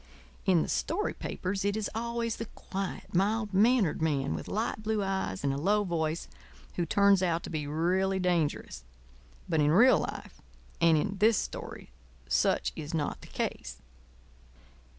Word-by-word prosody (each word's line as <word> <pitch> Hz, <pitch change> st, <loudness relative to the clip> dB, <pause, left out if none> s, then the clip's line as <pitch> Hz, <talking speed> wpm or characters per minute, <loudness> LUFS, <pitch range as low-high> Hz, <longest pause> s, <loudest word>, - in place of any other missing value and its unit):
In 180 Hz, -4 st, +4 dB
the -, -, -4 dB
story 410 Hz, +7 st, -1 dB
papers 190 Hz, +1 st, -3 dB
it 200 Hz, +1 st, 0 dB
is 215 Hz, -, -1 dB
always 235 Hz, 0 st, -2 dB
the 230 Hz, -, -5 dB
quiet, 195 Hz, -2 st, -6 dB
mild 205 Hz, +3 st, +1 dB
mannered 210 Hz, -4 st, +3 dB
man 140 Hz, -4 st, 0 dB
with -, -, -5 dB
light 215 Hz, 0 st, -2 dB
blue 215 Hz, -1 st, 0 dB
eyes 190 Hz, -, -2 dB
and 140 Hz, -1 st, +1 dB
a -, -, -3 dB
low 205 Hz, +6 st, +2 dB
voice 165 Hz, -3 st, -2 dB, 0.5 s
who 175 Hz, -2 st, -1 dB
turns 200 Hz, +1 st, +4 dB
out 170 Hz, -2 st, 0 dB
to -, -, -7 dB
be 150 Hz, -3 st, -3 dB
really 185 Hz, +5 st, +1 dB
dangerous; 165 Hz, -, -1 dB, 0.6 s
but 160 Hz, -, +1 dB
in 145 Hz, -, +3 dB
real 230 Hz, +11 st, +6 dB
life -, -, -6 dB, 0.4 s
and 165 Hz, -1 st, +5 dB
in 200 Hz, +6 st, -1 dB
this 220 Hz, +1 st, +5 dB
story -, -, -6 dB, 0.4 s
such -, -, +1 dB
is 155 Hz, +2 st, -5 dB
not 150 Hz, -2 st, -2 dB
the -, -, -12 dB
case. -, -, -4 dB
190 Hz, 160 wpm, -29 LUFS, 160-210 Hz, 0.6 s, real